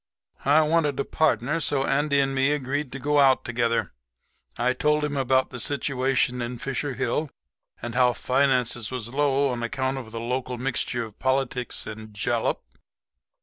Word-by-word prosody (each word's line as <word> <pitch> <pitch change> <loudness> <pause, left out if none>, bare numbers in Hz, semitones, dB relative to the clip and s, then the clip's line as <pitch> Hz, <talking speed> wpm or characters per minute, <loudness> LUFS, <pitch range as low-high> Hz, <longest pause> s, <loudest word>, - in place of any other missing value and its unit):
"I 150 +3 +5
wanted 150 -3 +1
a 140 - 0
partner, 150 0 +1
so 140 -3 +1
Andy 140 0 +2
and 135 0 +1
me 135 +2 +2
agreed 145 0 -2
to 135 - -5
go 145 +2 +2
out 135 -2 +4
together. 115 -1 0 0.6
I 125 +1 +2
told 150 +3 +1
him 145 -1 -1
about 130 -1 +2
the 125 - -6
situation 130 -2 0
in 120 +1 -4
Fisher 135 +2 -3
Hill 135 +5 -1 0.5
and 120 - -4
how 125 0 +4
finances 125 -4 +1
was 125 -3 -4
low 140 -1 +2
on 120 -2 -3
account 130 +3 -1
of 115 -4 -10
the 115 - -5
local 125 +1 -3
mixture 125 -1 -1
of 110 -2 -14
politics 130 -2 -1
and 110 -1 -9
jalap. 115 +3 0
130 Hz, 165 wpm, -25 LUFS, 120-140 Hz, 0.6 s, I